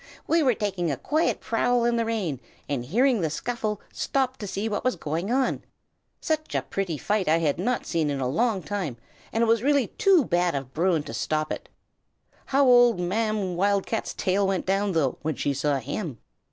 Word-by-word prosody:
"We 330 0 +3
were 255 -6 +3
taking 190 -5 -1
a 140 - -1
quiet 310 - 0
prowl 240 +1 +1
in 240 0 +2
the 230 -1 +1
rain, 200 - -2 0.3
and 140 -4 -2
hearing 235 - +2
the 160 - 0
scuffle, 215 +5 -3
stopped 265 -1 -1
to 205 - -5
see 200 +3 -2
what 210 -2 -2
was 255 - +1
going 165 +4 -3
on. 260 +1 +1 0.6
Such 310 -1 -2
a - - +1
pretty 185 -6 -3
fight 205 +5 0
I 160 - +5
had 160 -2 0
not 245 +7 -1
seen 160 -3 0
in 140 -1 -2
a 130 - 0
long 200 - 0
time, 185 - -3 0.3
and 225 - +1
it - - +2
was 225 -1 +3
really 280 -1 +3
too 385 - +5
bad 175 -2 +1
of 135 -2 -5
Bruin 165 -2 +1
to 115 - -8
stop 155 +6 -1
it. - - -5 0.8
How 275 +1 +3
old 245 -4 +6
Ma'am 200 0 -1
Wildcat's 200 +4 0
tail 195 +1 +1
went 190 -2 -1
down, 195 +1 +1
though, 150 -6 0
when 155 -1 -2
she 145 - -1
saw 145 +1 0
him!" 140 - -4
195 Hz, 200 wpm, -26 LUFS, 160-235 Hz, 0.8 s, old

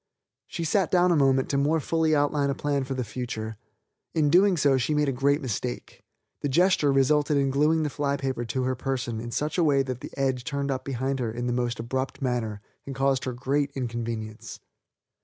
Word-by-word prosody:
She 170 - -4
sat 180 +3 +1
down 180 0 +4
a - - +4
moment 135 -3 +3
to 140 - +1
more 150 +3 +2
fully 160 +1 +1
outline 145 -1 +1
a 140 - 0
plan 140 -2 -1
for 135 0 -4
the 130 - -1
future. 110 -2 -5 0.6
In 150 -3 +3
doing 185 +2 +5
so 140 -3 +4
she 150 +5 0
made 150 0 +2
a - - +2
great 140 +3 +1
mistake. 95 - -4 0.4
The 145 - -1
gesture 170 -1 +3
resulted 145 +2 +3
in 135 -1 +2
gluing 155 +3 +2
the 150 - 0
fly 140 0 -1
paper 130 -3 -2
to 130 +3 -2
her 130 +1 0
person 125 -3 -3
in 120 - -6
such 150 +8 -2
a - - +4
way 140 -3 +3
that 130 -2 -5
the - - -7
edge 130 -2 0
turned 140 -1 -2
up 130 - -3
behind 135 0 -2
her 120 -3 -1
in 120 +2 -4
the 120 - 0
most 120 -1 -1
abrupt 130 +3 -3
manner 120 -6 -2 0.2
and 135 - -7
caused 135 0 +1
her 130 - -2
great 135 +3 0
inconvenience. 115 -4 -5
135 Hz, 215 wpm, -26 LUFS, 125-145 Hz, 0.6 s, doing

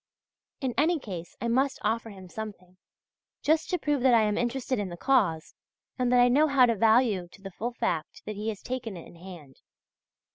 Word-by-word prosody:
In 260 -3 -1
any 330 +4 +3
case 180 - -8
I 235 - -2
must 265 +4 +1
offer 225 +2 -1
him 190 -3 -11
something, 185 -3 -8 0.7
just 315 +1 +2
to 360 - +1
prove 295 -5 -1
that 250 -1 +5
I 225 - +5
am 210 -1 +1
interested 245 0 -1
in 200 -2 -3
the 175 - -8
cause, 195 - +1 0.5
and 250 -1 +1
that 250 - +5
I 245 - +6
know 290 +5 +4
how 275 -3 +5
to 235 - +2
value 220 -3 +3
to 175 - -18
the 195 - -7
full 230 +6 -3
the 245 - -18
fact 170 -9 -2
that 215 - -5
he 210 +2 -3
has 210 -3 -6
taken 235 -6 -4
it 170 - -10
in - - -14
hand. 165 -7 -12
225 Hz, 215 wpm, -28 LUFS, 190-255 Hz, 0.7 s, I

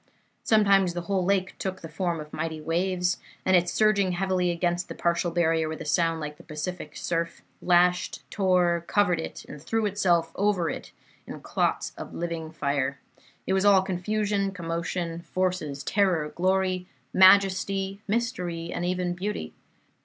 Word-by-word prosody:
Sometimes 195 -5 +4
the 175 - -2
whole 185 +1 -1
lake 190 0 0
took 185 -1 -4
the 165 - -7
form 170 +1 -2
of 150 0 -9
mighty 160 -1 -3
waves, 180 +3 0 0.3
and, 180 -2 +4
surging 205 -4 +2
heavily 185 0 0
against 175 +1 -1
the - - -6
partial 170 0 0
barrier 165 -2 +1
with 160 - -5
a 165 - -6
sound 165 +2 +1
like 150 -1 -6
the - - -15
Pacific 155 0 -6
surf, 170 0 -2 0.2
lashed, 180 0 +2
tore, 180 -3 +2
covered 180 -5 +2
it, - - -6
and 150 - -10
threw 225 +7 -1
itself 175 -5 +1
over 195 -5 +1
it - - -8 0.4
in - - -7
clots - - -1
of - - -8
living 165 -2 -4
fire. 140 -3 -1 0.5
It 190 - 0
was 190 0 +2
all 200 -2 +6
confusion, 200 +2 -1
commotion, 170 -1 -3
forces, 180 -6 -2
terror, 180 -6 +1
glory, 185 +1 0 0.3
majesty, 195 +1 +4
mystery, 180 -7 -2
and 175 - -3
even 180 0 -1
beauty. 180 - -4
180 Hz, 155 wpm, -26 LUFS, 165-190 Hz, 0.5 s, all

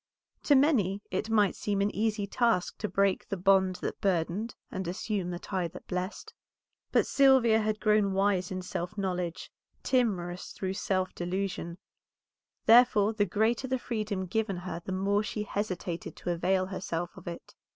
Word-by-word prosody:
To 290 - +5
many 215 - +3
it 190 +4 -2
might 210 -3 +3
seem 205 -1 -1
an 200 +1 +1
easy 215 -1 0
task 225 -3 0
to 210 - -2
break 195 +1 +1
the 195 - -2
bond 190 0 +3
that - - -4
burdened 190 +4 0 0.2
and 190 -2 -4
assume 185 +1 -2
the 175 - -3
tie 185 -1 -2
that 165 - -11
blessed. 185 +2 -4 0.6
But - - +3
Sylvia 260 -5 +5
had 215 0 -1
grown 210 -2 +3
wise 195 -2 +1
in 185 -1 -4
self 180 +3 -4
knowledge, 180 -2 -3 0.3
timorous 190 -8 0
through 190 -1 -3
self 185 -2 -1
delusion; 175 -1 -3 0.9
therefore 225 -3 +6
the 210 -2 +2
greater 220 +6 +1
the 260 0 0
freedom 215 -6 -3
given 200 +1 -1
her 175 -1 -5
the 190 - -5
more 200 +2 +1
she 210 0 -3
hesitated 185 -5 -4
to 175 - -3
avail 185 +2 +1
herself 175 -2 -4
of - - -13
it. 170 - -7
195 Hz, 160 wpm, -29 LUFS, 180-215 Hz, 0.9 s, therefore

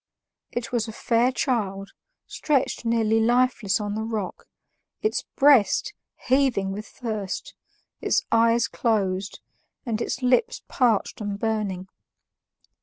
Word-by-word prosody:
It 240 -1 -4
was 235 -2 0
a - - -5
fair 235 +3 +2
child, 200 -7 -2 0.3
stretched 275 -5 -1
nearly 225 -1 +2
lifeless 240 -3 +2
on 205 -1 -3
the 215 - -2
rock, 220 -4 -4 0.6
its 430 - 0
breast 280 - +4 0.3
heaving 255 -7 +2
with 210 +2 -6
thirst, 215 -5 -5 0.5
its - - +1
eyes 230 +1 +4
closed, 200 -4 -1 0.4
and 230 -2 -2
its 250 - -3
lips 460 - +2
parched 230 -5 +1
and 205 -1 -3
burning. 205 -4 -2
225 Hz, 115 wpm, -25 LUFS, 205-250 Hz, 0.6 s, breast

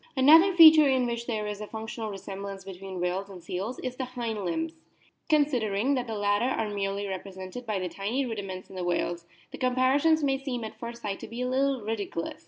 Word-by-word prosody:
Another 320 +8 +7
feature 315 -3 +9
in 260 -2 +2
which 235 0 -3
there 215 -3 -2
is 210 0 -5
a 210 - -5
functional 220 0 -5
re 200 - -6
semblance 195 0 -7
between 190 -1 -7
whales 180 +3 -2
and 185 -3 -11
seals 195 +8 -4
is 255 -1 -3
in - - -22
the 260 - -1
hind 235 -4 -4
limbs. 320 - -3 0.5
Considering 260 -6 +2
that 250 -2 -1
the 225 - -4
latter 205 +3 +2
are 210 -2 -2
merely 200 0 -2
re 190 -1 -3
presented 190 +5 -9
by 195 -4 -1
tiny 215 +9 -2
rudiments 195 -5 -5
in - - -13
the 185 - -3
whales, 175 -1 -1 0.2
the - - -9
comparison 260 +5 +3
may 270 -1 +1
seem 250 -4 -3
at 220 - -8
first 235 0 -7
sight 195 -2 -3
to - - -8
be 235 +2 -6
a - - -1
little 265 0 +1
ridiculous. 205 -6 -4
220 Hz, 215 wpm, -28 LUFS, 195-255 Hz, 0.5 s, feature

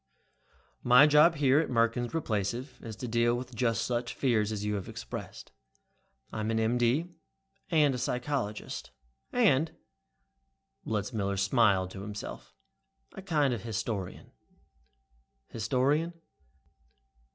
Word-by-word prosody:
"My 125 +4 +7
job 150 +3 +6
here 140 -1 +4
at 160 - -1
Merkins 120 +1 +1
Replacive 120 -1 -2
is 110 -2 -7
to 125 +3 -6
deal 120 +1 +2
with 125 +1 -6
just 115 -1 0
such 120 0 -2
fears 110 -5 +1
as 105 -1 -3
you 105 - -1
have 100 -3 -4
expressed. - - -8 0.8
I'm 110 0 -2
an 110 0 +1
M.D. 120 +9 +1 0.6
and 150 -4 +4
a 125 - -3
psychologist, 125 -4 -3 0.4
and" 155 +5 +2 1.1
Letzmiller 105 -2 -2
smiled 95 -2 +3
to 95 - -8
himself 105 +1 -7 0.6
"a - - -8
kind 150 -8 +1
of 120 - -4
historian." 110 -4 -4 1.2
"Historian?" 145 +9 0
120 Hz, 115 wpm, -30 LUFS, 110-135 Hz, 1.2 s, My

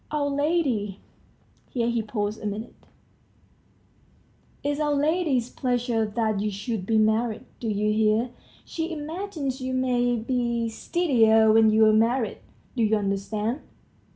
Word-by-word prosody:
Our 290 -1 0
lady.. 280 - 0 0.4
." - - -36
here 235 -2 -1
he 235 -1 +1
paused 210 -1 -3
a 210 - -3
minute, 215 +3 -5 1.9
"it's 290 +1 -1
our 295 -1 +1
lady's 290 -5 +1
pleasure 245 -3 0
that 215 -1 -1
you 210 +1 0
should 205 -1 -4
be 225 - +2
married. 220 +2 +1
Do 230 - -3
you 210 0 +1
hear? 220 +3 +2 0.3
She 330 +1 -4
imagines 310 -3 -4
you 260 0 -2
may 245 -1 +1
be 235 0 -1
steadier 225 -6 +3
when 220 0 +6
you're 215 0 +5
married. 230 +2 +1 0.4
Do 240 - 0
you 220 -1 +3
understand?" 210 +5 -2
235 Hz, 135 wpm, -25 LUFS, 215-265 Hz, 1.9 s, when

